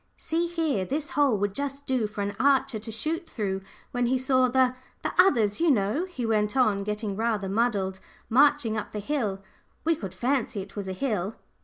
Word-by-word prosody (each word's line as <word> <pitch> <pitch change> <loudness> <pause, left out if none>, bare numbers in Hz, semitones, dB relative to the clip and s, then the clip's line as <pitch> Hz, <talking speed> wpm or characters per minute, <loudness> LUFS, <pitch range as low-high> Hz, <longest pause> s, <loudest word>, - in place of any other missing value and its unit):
"See 335 +2 -1
here, 320 - 0
this 285 +9 -3
hole 280 -7 +3
would 205 0 -1
just 280 +1 -4
do 255 -5 +1
for 210 0 -5
an 200 0 -2
archer 265 -4 +3
to 225 +2 -6
shoot 320 +9 -3
through 195 -4 -2 0.3
when 245 -2 0
he 260 +2 +2
saw 255 0 +3
the 255 0 +3 0.3
the - - -2
others 235 - +4
you 340 - +4
know," 230 - +2
he 260 -10 -4
went 215 +1 +1
on, 210 -6 +3
getting 210 0 -3
rather 220 -2 0
muddled, 195 -3 0 0.3
"marching 275 -2 +4
up - - -8
the 210 - -3
hill 210 -5 -2 0.4
we 330 +1 +3
could 195 - -7
fancy 240 -2 0
it 200 - -15
was 200 -2 -4
a 190 - -3
hill." 210 -2 -2
230 Hz, 195 wpm, -27 LUFS, 205-280 Hz, 0.4 s, others